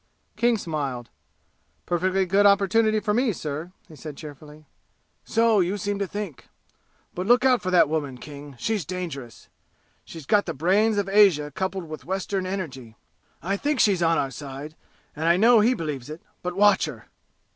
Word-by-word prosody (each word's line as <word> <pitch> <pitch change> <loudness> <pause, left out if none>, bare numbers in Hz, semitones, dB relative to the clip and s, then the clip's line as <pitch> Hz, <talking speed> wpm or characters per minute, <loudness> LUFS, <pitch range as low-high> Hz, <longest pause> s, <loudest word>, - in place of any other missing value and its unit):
King 235 -1 +2
smiled. 140 - -4 0.7
"Perfectly 185 +2 +1
good 200 +3 +4
opportunity 215 +2 +3
for 210 0 -1
me, 245 +1 +2
sir!" 155 0 -5 0.2
he 155 - -14
said 150 -1 -9
cheerfully. 150 +1 -11 0.6
"So 225 -2 +2
you 185 +3 0
seem 205 +1 -3
to 200 - -1
think. 205 -7 -7 0.7
But 180 +2 -4
look 245 +2 +4
out 255 -3 +4
for 185 - -3
that 180 -4 +5
woman, 145 -4 -3
King 145 +1 -10
she's 215 - -1
dangerous. 160 -10 -7 0.6
She's 165 -4 -11
got 205 +6 +2
the 165 - -3
brains 200 +8 +2
of 200 -2 0
Asia 195 -8 +4
coupled 190 0 -3
with 155 0 -8
Western 190 +1 -3
energy! 135 - -6 0.5
I 195 +4 -1
think 290 +3 -1
she's 195 -5 +3
on 165 -1 +3
our 135 -2 -1
side, 145 +2 -8 0.4
and 155 +2 -4
I 170 +1 +4
know 230 +3 +6
he 235 +4 +3
believes 150 - -5
it; 155 +2 -9 0.2
but 180 0 -4
watch 205 -1 +4
her!" 125 -9 -9
180 Hz, 170 wpm, -24 LUFS, 150-205 Hz, 0.7 s, know